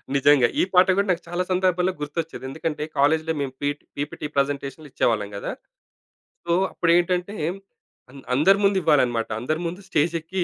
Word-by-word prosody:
నిజంగా! 140 -2 +5
ఈ - - +4
పాట 180 0 +6
గూడా 200 +1 +2
నాకు 175 -1 -1
చాలా 175 +1 -1
సందర్భాల్లో 185 0 +2
గుర్తొచ్చేది. 155 0 -4
ఎందుకంటే, 150 +2 -3
కాలేజ్‌లో 160 +3 +2
మేము 135 -2 -3
పి 145 - +1 0.3
పీపీటీ 145 +1 -4
ప్రజెంటేషన్‌లు 140 +2 -2
ఇచ్చేవాళ్ళం 110 -5 0
గదా! 100 - -4 0.9
సో, 170 - -1 0.2
అప్పుడేంటంటే 175 +3 +1 0.8
అంద్ 135 0 -12
అందరి 190 +9 +5
ముందు 200 0 +4
ఇవ్వాలనమాట. 120 -7 +2
అందరి 155 +7 -2
ముందు 175 +3 -5
స్టేజెక్కి 165 +3 0
160 Hz, 145 wpm, -23 LUFS, 140-180 Hz, 0.9 s, పాట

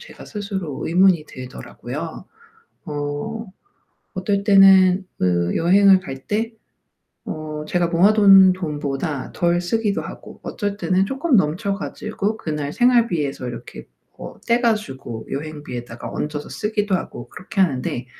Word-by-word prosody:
제가 485 - -12
스스로 195 -8 -5
의문이 180 -1 +4
들더라고요. 125 - -8 0.6
어 145 +10 -4 0.7
어떨 200 +1 -1
때는 195 -2 +6
그 85 -1 +1
여행을 190 +3 +5
갈 135 -7 -8
때 225 +2 -1 0.7
어 155 -1 -5
제가 175 +1 +1
모아둔 195 +2 +6
돈보다 150 -4 -3
덜 175 0 +1
쓰기도 205 +3 -1
하고 - - -10
어쩔 205 -2 -3
때는 190 -1 +1
쪼끔 270 +2 +1
넘쳐 180 +3 +1
가지고 215 +1 -3
그날 150 -6 -4
생활비에서 225 - +2
이렇게 120 - -8 0.3
뭐 - - -9
떼 235 +1 +3
가지고 135 - -2
여행비에다가 140 -5 -6
얹어서 150 -1 -4
쓰기도 210 -2 -1
하고 120 -8 -7
그렇게 185 +6 -5
하는데 130 -7 0
185 Hz, 280 characters per minute, -21 LUFS, 145-205 Hz, 0.7 s, 때는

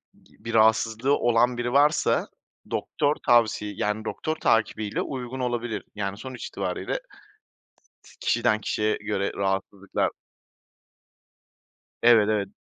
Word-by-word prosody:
bir 115 - -10
rahatsızlığı 110 +4 +3
olan 120 +1 +2
biri 120 +1 -2
varsa 145 +2 +3 0.4
doktor 145 0 0
tavsi 110 -3 +3
yani, 105 +1 -1
doktor 155 +7 -3
takibiyle 110 -5 0
uygun 130 -1 -5
olabilir. 120 -3 -2
Yani 100 -1 -3
sonuç 130 +1 -7
itibariyle - - -3 1.0
t - - -17
kişiden 110 0 +1
kişiye 105 +1 0
göre 100 -2 -2
rahatsızlıklar 95 0 -1 1.9
Evet, 115 -3 +6
evet. 100 -2 0
115 Hz, 105 wpm, -25 LUFS, 105-120 Hz, 1.9 s, Evet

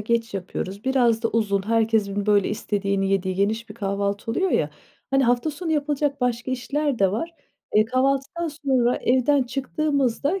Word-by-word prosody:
geç 230 0 -1
yapıyoruz. 195 +2 -5
Biraz 245 -4 +2
da 230 - +2
uzun, 200 -4 0
herkesin, 220 -3 +1
böyle, 205 -2 +3
istediğini 200 -2 -1
yediği 190 -1 0
geniş 215 +4 0
bir 210 - -9
kahvaltı 200 0 -2
oluyor 370 +10 0
ya, - - +1 0.4
hani, 270 -1 +3
hafta 245 +5 +2
sonu 325 +2 -3
yapılacak 290 -2 0
başka 245 0 -1
işler 280 +1 -1
de 195 -1 +3
var. 330 +10 -3 0.4
Eee, 215 0 +6
kahvaltıdan 275 +7 0
sonra 265 -5 +1
evden 260 +2 +2
çıktığımızda 280 +4 -1
235 Hz, 155 wpm, -23 LUFS, 205-275 Hz, 0.4 s, Eee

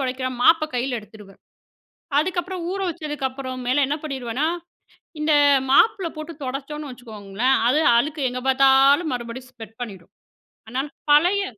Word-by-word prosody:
தொடைக்கிற 255 -1 -2
மாப்ப 325 +2 +5
கையில 245 0 -1
எடுத்துருவேன். 210 -2 -16 0.8
அதுக்கப்பறம் 360 +1 -3
ஊற 390 - -4
வச்சதுக்கப்பறம் 270 -5 -5
மேல 280 +3 +3
என்ன 290 +3 -1
பண்ணிருவேன்னா, 265 -1 -2 0.8
இந்த 305 0 +2 0.4
மாப்புல 390 +3 +4
போட்டு 310 +2 -7
தொடச்சோனு 280 +3 -5
வச்சுக்கோங்களேன், 230 +1 -2
அது 300 +4 +3 0.2
அழுக்கு 300 +5 -1
எங்க 250 0 -5
பாத்தாலும் 275 +4 +4
மறுபடியும் 245 +1 -6
ஸ்ப்ரெட் 225 -2 -12
பண்ணிரும். 195 -7 -11 0.6
அனா 255 +3 -1 0.3
பழைய 355 +7 +4
270 Hz, 125 wpm, -22 LUFS, 245-305 Hz, 0.8 s, மாப்ப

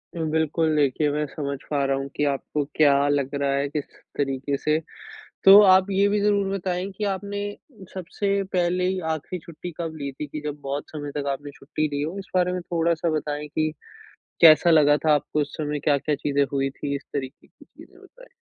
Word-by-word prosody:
बिल्कुल, 160 0 0
देखिए 145 +1 +2
मैं 150 +1 -1
समझ 140 -1 -4
पा 145 -2 0
रहा 135 0 +1
हूँ 135 0 -4
कि 150 - 0
आपको 145 +1 -1
क्या 140 -2 +4
लग 140 -1 0
रहा 140 -1 0
है 140 +1 0
किस 145 -1 -3 0.3
तरीके 140 0 -1
से। 155 +2 +1 0.7
तो 195 +2 +11
आप 190 -1 +5
ये 195 +1 +3
भी 210 - +1
ज़रूर 205 -1 +2
बताएँ 185 0 -3
कि 215 - -3
आपने 200 +1 -3 0.4
उ - - -10
सबसे 195 +2 -2
पहले 180 0 +1
ही 185 0 -1
आख़िरी 160 +2 -4
छुट्टी 170 +1 -8
कब 165 -2 -4
ली 140 -2 -4
थी, 145 +2 -7
कि 150 - -6
जब 150 0 -4
बहुत 140 +1 -4
समय 145 -2 -6
तक 140 -1 -3
आपने 145 +1 -6
छुट्टी 155 +2 -3
ली 145 - -1
हो? 160 +6 -3
इस 195 - -9
बारे 180 0 +3
में 180 - -3
थोड़ा-सा 170 -1 0
बताएँ 150 0 -3
कि 155 +1 -1 0.7
कैसा 165 +1 +8
लगा 150 -2 +5
था 155 - +5
आपको 150 +1 0
उस 145 - -4
समय, 150 -1 -2
क्या-क्या 145 +1 +1
चीज़ें 140 0 +1
हुई 135 0 +1
थी? 140 +1 -4
इस 140 - -6
तरीके 135 -1 -5
की - - -21
चीज़ें - - -17
बताएँ? - - -18
150 Hz, 205 wpm, -24 LUFS, 145-180 Hz, 0.7 s, तो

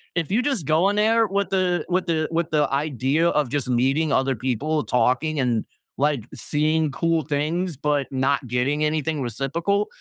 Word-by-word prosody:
If 165 -2 -1
you 220 +5 +3
just 250 - -1
go 160 +6 +3
in 205 - -1
there 225 +2 +3
with 200 0 -1
the 180 -3 0
with 180 0 0
the 160 -2 0
with 165 0 -1
the 150 -2 +2
idea 140 +2 +1
of 150 -6 0
just 140 -3 -2
meeting 135 +5 +1
other 135 -1 +1
people, 130 +6 -1
talking, 135 +5 +1
and, 120 -4 0 0.3
like, 140 -5 0
seeing 155 +1 0
cool 165 +2 0
things, 155 +4 -2
but 145 -1 0
not 135 +1 0
getting 135 +5 0
anything 155 -1 -1
reciprocal, 165 - -1
150 Hz, 175 wpm, -23 LUFS, 135-170 Hz, 0.3 s, you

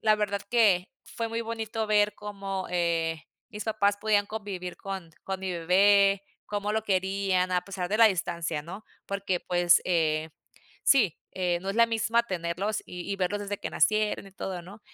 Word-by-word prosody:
la 215 -1 +4
verdad 205 -1 -1
que 205 -7 +4 0.2
fue 230 -1 -4
muy 230 +1 -2
bonito 225 -1 -3
ver 210 0 +3
cómo, 195 -2 -5
eh, 165 -2 0 0.3
mis 210 0 -6
papás 205 -2 +1
podían 205 -1 +2
convivir 195 -4 -6
con 190 -4 -6
con 190 -1 -3
mi 190 -1 -3
bebé, 195 +3 +4 0.2
cómo 205 0 -2
lo 220 0 0
querían 190 -1 +1
a 180 -1 +1
pesar 185 -2 -4
de 210 - +1
la 230 - +9
distancia, 170 -5 -1
¿no? 190 +7 -9 0.2
Porque 200 -2 -2
pues, 175 -1 +4
eh, 160 -3 +1 0.5
sí, 220 - +4
eh, 180 -2 0
no 190 - -6
es 200 - -2
la 230 0 +6
misma 225 +1 +1
tenerlos 185 0 -2
y 180 +2 -7
y - - -2
verlos 195 +2 -1
desde 205 0 -4
que - - -4
nacieron 215 -1 +1
y 195 - -13
todo, 185 -2 -5
¿no? 200 +5 -12
195 Hz, 180 wpm, -28 LUFS, 180-210 Hz, 0.5 s, la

